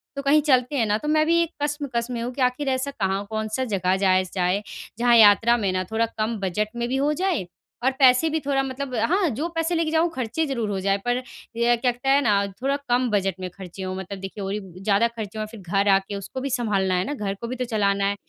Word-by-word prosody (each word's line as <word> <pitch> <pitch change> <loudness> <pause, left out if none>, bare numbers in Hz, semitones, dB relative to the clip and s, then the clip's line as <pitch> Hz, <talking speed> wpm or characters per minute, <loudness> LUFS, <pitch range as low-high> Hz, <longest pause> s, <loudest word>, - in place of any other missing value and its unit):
तो 280 - -3
कहीं 290 +2 +4
चलते 255 +2 +3
हैं 230 - +2
ना।" 210 0 +1
तो 300 - -6
मैं 310 0 +3
भी 335 0 +4
एक 335 - -7
कश्मकश 285 -5 -2
में 235 -1 -3
हूँ 245 - -3
कि 265 - -5
आखिर 255 +3 +1
ऐसा 260 +2 -1
कहाँ 195 -4 -2
कौन-सा 220 +3 -2
जगह 190 -3 0
जाया 185 -1 +3
स 185 - -11
जाए, 185 +2 +1 0.4
जहाँ 240 0 +5
यात्रा 225 +3 +6
में 200 -4 0
ना 185 0 0
थोड़ा 225 +1 +2
कम 220 +1 -1
बजट 200 +3 -1
में 235 0 -2
भी 265 - 0
हो 290 +2 +1
जाए 345 - 0 0.4
और 265 - +3
पैसे 260 +4 +5
भी 320 +1 0
थोड़ा 275 -1 0
मतलब 265 0 -5
हाँ, 320 - +2
जो 285 +8 -2
पैसे 330 +1 0
लेके 325 -1 0
जाऊँ 325 +1 +2
खर्चे 260 +6 -2
ज़रूर 235 -6 -2
हो 195 -1 -2
जाएँ 195 +1 +1
पर 245 +1 +1 0.4
ये 240 +1 +3
कहते 245 +2 -1
हैं 280 +1 +5
ना, 200 -4 +2 0.2
थोड़ा 275 +1 +1
कम 245 0 +2
बजट 195 -3 +1
में 185 -1 -4
खर्चे 190 +1 -9
हों 185 0 -4
मतलब 190 +1 -6
देखिए 195 +1 -7
और 195 +1 -3
ही 210 - -2 0.2
ज़्यादा 205 +3 +3
खर्चे 220 -2 -7
हों 215 - -2
फिर 225 - -10
घर 195 +3 0
आके 195 +1 +2
उसको 200 +6 -6
भी 275 - -2
सँभालना 205 -7 0
है 180 - +1
ना? 290 - -3
घर 205 -7 -3
को 235 - -4
भी 255 - -4
तो 250 0 -2
चलाना 200 -3 +1
है। 200 0 +1
230 Hz, 255 wpm, -24 LUFS, 200-270 Hz, 0.4 s, यात्रा